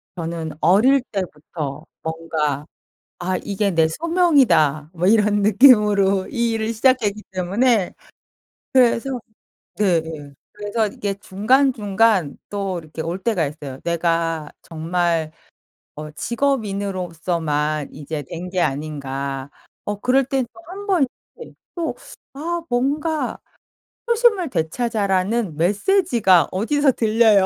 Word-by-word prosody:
저는 165 -2 -4
어릴 215 - +4
때부터 155 -5 -5 0.2
뭔가 160 -3 -2 0.5
'아 185 +1 -1
이게 200 0 -1
내 160 -1 +3
소명이다.' 230 - +2
뭐 175 +1 0
이런 210 -1 +3
느낌으로 205 -3 +5
이 235 -3 0
일을 225 0 -1
시작했기 220 -3 +2
때문에 195 +3 +1 0.8
그래서 255 0 +2 0.6
네네 160 -7 -1 0.2
그래서 210 +2 -1
이게 200 0 -4
중간중간 210 - +2
또 195 -3 -2
이렇게 160 -1 -9
올 170 +3 -3
때가 205 -9 +1
있어요. 140 -2 -7
'내가 165 -2 0
정말 165 -1 -1 0.6
어 150 0 -7
직업인으로서만 180 - -1
이제 150 +1 -5
된 170 +6 -7
게 185 0 -1
아닌가.' 140 -2 -3 0.3
어 205 0 -3
그럴 260 +4 +3
때는 265 -1 -1
또 225 - -15
1 405 +2 -8
번 360 -8 +3 0.3
네 475 - -11 0.2
또 340 -2 -2 0.4
아 335 +4 -3
뭔가 295 +6 -1 0.7
'초심을 460 - +3
되찾아.'라는 200 0 0
메시지가 205 - +3
어디서 275 +9 +2
들려요. 220 -3 +4
195 Hz, 235 characters per minute, -21 LUFS, 165-235 Hz, 0.8 s, 느낌으로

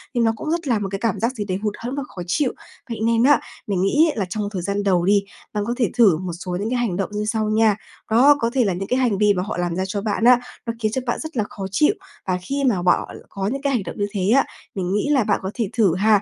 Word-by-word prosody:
thì 240 - +2
nó 225 -1 +4
cũng 310 - -5
rất 335 -2 -2
là 235 -5 +2
một 200 - -2
cái 195 - -3
cảm 230 - -1
giác 230 +3 +1
gì 210 -3 -3
đấy 185 -2 -2
hụt 210 -1 0
hẫng 245 +3 -5
và 280 - -2
khó 180 - -8
chịu. 250 +9 +1 0.4
Vậy 230 -2 -4
nên 230 0 +3
á, 275 -1 +6 0.3
mình 195 -3 0
nghĩ 285 - +4
ấy - - -10
là 200 - 0
trong 205 +1 -2
thời 190 -4 -3
gian 200 +3 -1
đầu 180 -3 +2
đi, 200 +1 +4 0.3
bạn 210 -1 -1
có 240 - 0
thể 235 - +2
thử 205 -9 +6
một 180 0 -5
số 180 +1 -5
những 210 +3 -2
cái 250 - 0
hành 225 -7 0
động 195 - -1
như 210 0 -2
sau 215 0 0
nha. 215 -1 +3 0.4
Đó, 265 +6 +6
có 230 -3 +1
thể 260 -2 +3
là 195 - +1
những 190 +3 -4
cái 255 +1 +1
hành 235 -6 +2
vi 210 0 +4
mà 180 -1 -1
họ 205 - -4
làm 175 -1 -1
ra 185 - -1
cho 200 +1 -3
bạn 215 +1 -1
á 245 0 +7 0.3
nó 230 - -2
khiến 215 -2 0
cho 260 - -1
bạn 240 - 0
rất 315 -5 -6
là 215 - +2
khó 195 - -6
chịu, 300 - +3 0.3
và 185 -1 +1
khi 275 +9 -2
mà 225 -9 +2
bọ 175 0 +3 0.2
có 195 0 -3
những 270 +6 -2
cái 280 -1 0
hành 235 -6 0
động 175 - -7
như 205 - 0
thế 195 -1 -1
á, 275 - +4 0.3
mình 185 -1 -2
nghĩ 210 +8 0
là 275 -5 +4
bạn 205 -1 +1
có 190 - -3
thể 225 -5 -2
thử 200 -8 +3
ha 205 +1 +4
210 Hz, 310 wpm, -22 LUFS, 195-240 Hz, 0.4 s, á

